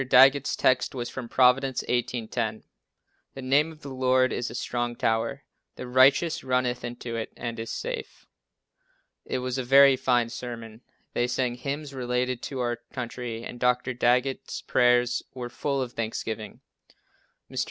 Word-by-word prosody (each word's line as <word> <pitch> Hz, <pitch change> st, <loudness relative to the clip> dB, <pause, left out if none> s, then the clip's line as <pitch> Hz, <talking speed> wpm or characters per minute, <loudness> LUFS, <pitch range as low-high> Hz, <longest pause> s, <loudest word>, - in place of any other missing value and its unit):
Daggett's 135 Hz, +2 st, +6 dB
text 130 Hz, +1 st, +2 dB
was 120 Hz, -2 st, -3 dB
from 125 Hz, -3 st, -6 dB
Prov. 125 Hz, +1 st, +5 dB
18: 125 Hz, -3 st, -2 dB
10: 110 Hz, -2 st, -3 dB, 0.7 s
"The 135 Hz, -, -6 dB
name 145 Hz, +5 st, +3 dB
of 155 Hz, -1 st, -15 dB
the 140 Hz, -1 st, -7 dB
Lord 130 Hz, 0 st, +2 dB
is 120 Hz, -, -2 dB
a -, -, -8 dB
strong 120 Hz, 0 st, -2 dB
tower; 115 Hz, +5 st, 0 dB, 0.3 s
the -, -, -7 dB
righteous 135 Hz, +6 st, +4 dB
runneth 125 Hz, -1 st, 0 dB
into 120 Hz, -1 st, -5 dB
it, 115 Hz, -1 st, -4 dB
and 115 Hz, -1 st, -5 dB
is 115 Hz, -, -5 dB
safe." -, -, -5 dB, 1.0 s
It -, -, -2 dB
was 130 Hz, +1 st, -2 dB
a -, -, -1 dB
very 135 Hz, +2 st, +7 dB
fine 125 Hz, -2 st, +1 dB
sermon. 115 Hz, -2 st, -7 dB, 0.3 s
They 120 Hz, -, +1 dB
sang 125 Hz, 0 st, 0 dB
hymns 140 Hz, +3 st, -5 dB
relating 125 Hz, -1 st, -1 dB
to 130 Hz, 0 st, -4 dB
our 120 Hz, -1 st, -1 dB
country 120 Hz, -2 st, -5 dB
and 120 Hz, -, -8 dB
Dr. 125 Hz, +1 st, +1 dB
Daggett's 125 Hz, +2 st, 0 dB
prayers 125 Hz, 0 st, +3 dB
were 125 Hz, -1 st, -5 dB
full 140 Hz, +1 st, -1 dB
of 120 Hz, -1 st, -8 dB
thanksgiving. 110 Hz, -1 st, -4 dB, 0.9 s
Mr. -, -, -3 dB
125 Hz, 155 wpm, -27 LUFS, 120-130 Hz, 1.0 s, very